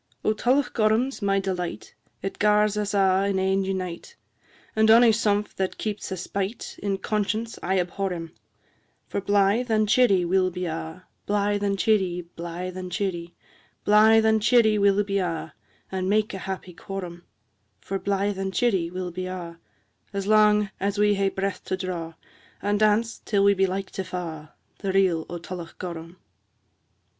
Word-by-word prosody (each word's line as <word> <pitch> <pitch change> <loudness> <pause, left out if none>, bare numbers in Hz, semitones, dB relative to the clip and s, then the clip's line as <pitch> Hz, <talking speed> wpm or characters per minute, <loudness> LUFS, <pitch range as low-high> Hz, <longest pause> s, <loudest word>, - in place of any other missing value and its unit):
II. - - +4
O - - +1
Tullochgorum 245 0 +2
's - - -10
my 195 -1 +2
delight, 185 -3 -4 0.3
It 195 - -4
gars 210 0 +3
us 210 -1 -1
a' 195 0 +3
in 195 - 0
ane 190 +1 +1
unite, 185 -3 -4 0.6
And 220 0 +4
ony 230 +1 +7
sumph 210 -2 0
that 190 -1 -2
keeps 210 -2 -4
a 190 - -3
spite, 200 +5 -4
In 195 -1 -1
conscience 215 +3 -2
I 190 +2 +1
abhor 185 +2 -2
him: 165 -2 -5 0.7
For 200 - -3
blythe 205 +5 +2
and 215 -1 +2
cheerie 205 -5 +4
we'll 185 +1 +2
be 180 0 -4
a', 160 +2 -6 0.2
Blythe 205 0 +1
and 200 -1 0
cheerie, 190 -5 +1
blythe 175 +2 -5
and 185 -1 -6
cheerie, 175 -3 -3 0.5
Blythe 220 +1 +6
and 220 0 +3
cheerie 220 -2 +4
we'll 200 0 +4
be 200 0 -1
a', 165 -3 -3 0.4
And 190 0 -2
make 215 +1 +1
a 190 - -5
happy 185 -1 -6
quorum; 175 -1 -7 0.6
For 195 0 -4
blythe 200 0 -1
and 190 0 -2
cheerie 190 -6 +1
we'll 180 0 -5
be 185 +1 -4
a' 170 -2 -7 0.5
As 200 -1 -2
lang 210 -1 +4
as 200 +1 -1
we 210 0 +4
hae 195 -1 +1
breath 195 0 -3
to 185 - -2
draw, 170 -3 -5 0.4
And 205 0 0
dance, 215 +2 +2
till 200 -2 +1
we 200 0 +6
be 195 0 +2
like 190 +1 -4
to 190 - -4
fa', 165 -5 -6 0.3
The 195 -2 -2
Reel 185 -4 +2
o' 175 - -4
Tullochgorum. 170 -1 -7
195 Hz, 170 wpm, -25 LUFS, 185-210 Hz, 0.7 s, ony